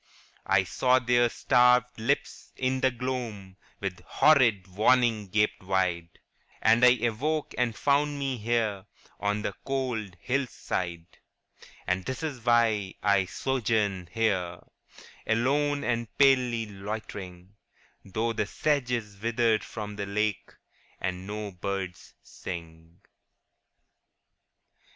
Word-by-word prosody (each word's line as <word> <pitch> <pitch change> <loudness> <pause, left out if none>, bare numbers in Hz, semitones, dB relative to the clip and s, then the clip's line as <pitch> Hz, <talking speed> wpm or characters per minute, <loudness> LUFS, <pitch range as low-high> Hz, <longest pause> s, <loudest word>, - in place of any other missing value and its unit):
* - - -32
I 95 -1 +4
saw 125 +7 +2
their 120 -1 +3
starved 125 -1 +3
lips 110 - -2
in 130 0 -1
the 130 - +4
gloam 120 -6 -5 0.2
With 95 -3 -4
horrid 120 -11 +4
warning 110 +2 +2
gaped 105 +2 +1
wide, 90 -3 -1 0.4
And 115 +2 +4
I 125 0 +7
awoke 145 +7 -1
and 120 -2 0
found 145 +1 +1
me 135 -2 -2
here 110 -3 -1 0.3
On 105 +1 -1
the 100 - -2
cold 125 -8 -2
hill 135 +4 -1
side. 85 -6 -5 0.3
' - - -22
And 90 0 0
this 130 - -5
is 140 -7 -4
why 115 -5 +2
I 100 -2 +3
sojourn 105 -3 -1
here 95 -6 0 0.7
Alone 140 +6 +1
and 120 -1 -1
palely 125 -4 +4
loitering, 100 -2 -7 0.5
Though 110 +4 -2
the 105 -2 -1
sedge 145 0 0
is 105 -5 -3
withered 115 -1 +2
from 105 -2 -7
the 100 -1 -3
lake, 105 -1 -1 0.5
And 90 0 -4
no 105 0 -5
birds 95 0 -5
sing.' 80 -1 -9
J. - - -32
110 Hz, 125 wpm, -28 LUFS, 95-125 Hz, 0.7 s, I